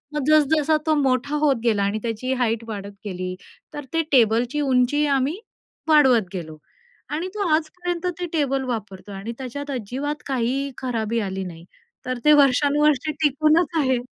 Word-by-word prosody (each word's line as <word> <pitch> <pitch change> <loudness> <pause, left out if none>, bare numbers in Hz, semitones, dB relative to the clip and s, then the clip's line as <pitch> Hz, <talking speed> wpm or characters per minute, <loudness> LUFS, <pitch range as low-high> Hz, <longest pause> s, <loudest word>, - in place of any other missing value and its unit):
मग 295 - -1
जस 310 -1 +6
जसा 310 +1 +2
तो 310 - +4
मोठा 270 +2 0
होत 275 -2 +4
गेला 210 -4 +2
आणि 205 +2 -1
त्याची 235 +3 -2
हाईट 230 -1 0
वाढत 200 -1 -6
गेली 185 -1 -4 0.4
तर 290 -2 -6
ते 330 - +2
टेबलची 240 +2 +3
उंची 270 +2 +2
आम्ही 280 +7 0 0.5
वाढवत 260 - +5
गेलो 160 -4 -6 0.5
आणि 330 +5 -3
तो 405 -3 -1
आजपर्यंत 350 +2 -3
ते 355 - -2
टेबल 275 -3 0
वापरतोय 205 -4 -6
आणि 200 +4 -6
त्याच्यात 280 +2 -6
अजिबात 270 +5 -4
काही 270 +1 -1
खराबी 230 -3 -2
आली 190 -2 -3
नाही. 170 -1 -10 0.4
तर 255 -1 -2
ते 300 - +7
वर्षानुवर्षे 290 +1 +3
टिकूनच 310 +3 +2
आहे. 260 -3 +2
265 Hz, 155 wpm, -23 LUFS, 225-295 Hz, 0.5 s, ते